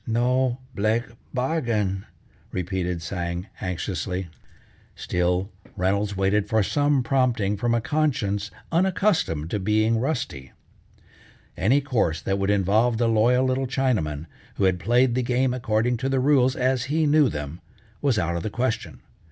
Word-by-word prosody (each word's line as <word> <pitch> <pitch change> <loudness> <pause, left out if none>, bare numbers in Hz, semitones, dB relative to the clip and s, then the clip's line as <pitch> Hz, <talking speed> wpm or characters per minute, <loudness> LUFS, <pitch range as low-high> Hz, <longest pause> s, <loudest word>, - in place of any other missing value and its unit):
"No 125 +2 +1 0.2
blake 110 +3 +1 0.3
bargain!" 115 -8 -1 0.4
repeated 90 -2 -2
Tsang 85 0 -3 0.2
anxiously. 90 -1 -3 0.7
Still 90 +3 -1 0.3
Reynolds 100 +2 0
waited 100 +2 +1
for 110 -1 +3
some 145 +3 +2
prompting 120 -6 +1
from 120 +3 0
a 115 - +1
conscience 110 -8 0 0.2
unaccustomed 175 - +1
to 105 - 0
being 110 +3 +2
rusty. 120 - -3 1.0
Any 125 +11 +3
course 115 - 0
that 95 0 -1
would 95 0 0
involve 105 +4 +2
the 120 0 +2
loyal 120 +3 +3
little 130 +1 0
Chinaman, 105 - -1 0.3
who - - -1
had 95 -2 +2
played 120 +4 +3
the 130 - +1
game 125 +1 +1
according 120 -1 0
to 130 +3 -2
the 135 -1 +1
rules 130 -1 +3
as 130 -1 +1
he 155 +4 +1
knew 150 -2 +4
them, 75 0 -6 0.4
was 135 -6 +2
out 85 -3 0
of 85 - -2
the 110 - -3
question. 115 0 -3
110 Hz, 145 wpm, -24 LUFS, 95-130 Hz, 1.0 s, knew